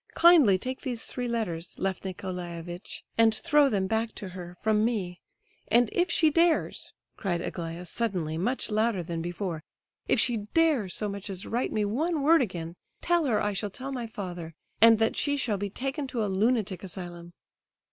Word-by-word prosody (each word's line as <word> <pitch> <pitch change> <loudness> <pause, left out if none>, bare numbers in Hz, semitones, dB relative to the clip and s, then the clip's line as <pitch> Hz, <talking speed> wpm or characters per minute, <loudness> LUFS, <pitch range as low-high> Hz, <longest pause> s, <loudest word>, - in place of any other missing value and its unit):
Kindly 325 - +7
take 255 +6 -5
these 245 -5 -3
three 250 -1 -3
letters, 185 -8 -3
Lef 190 -1 -1
Nicolaievitch, 180 -2 -6 0.2
and 225 -1 +5
throw 295 0 +4
them 195 -5 +1
back 225 +3 -1
to 195 - -7
her, 180 -1 -9
from 215 0 +3
me. 195 -7 -1 0.5
And 240 0 +3
if 355 0 +2
she 315 -3 +4
dares," 335 +1 +1 0.3
cried 175 -4 -1
Aglaya 170 0 -5
suddenly, 180 -5 -2
much 230 +8 -1
louder 215 -3 +1
than 165 0 -4
before, 175 -1 -4 0.5
"if - - +3
she 240 -3 +3 0.2
dares 295 - +3
so 210 - -1
much 200 0 -5
as 190 -1 -5
write 240 +3 -1
me 210 -1 +1
one 300 +8 0
word 325 +2 +6
again, 170 -7 -3 0.3
tell 345 -2 +2
her 230 -6 +2
I 205 0 0
shall 205 +2 -2
tell 260 +7 -6
my 245 -3 -4
father, 180 -7 -6 0.3
and 225 0 +8
that 225 +1 +1
she 285 -1 0
shall 220 -7 -1
be 200 0 -2
taken 270 - -3
to 235 -5 -1
a 195 - -2
lunatic 210 -2 +1
asylum." 175 -2 -8
210 Hz, 180 wpm, -28 LUFS, 180-250 Hz, 0.5 s, and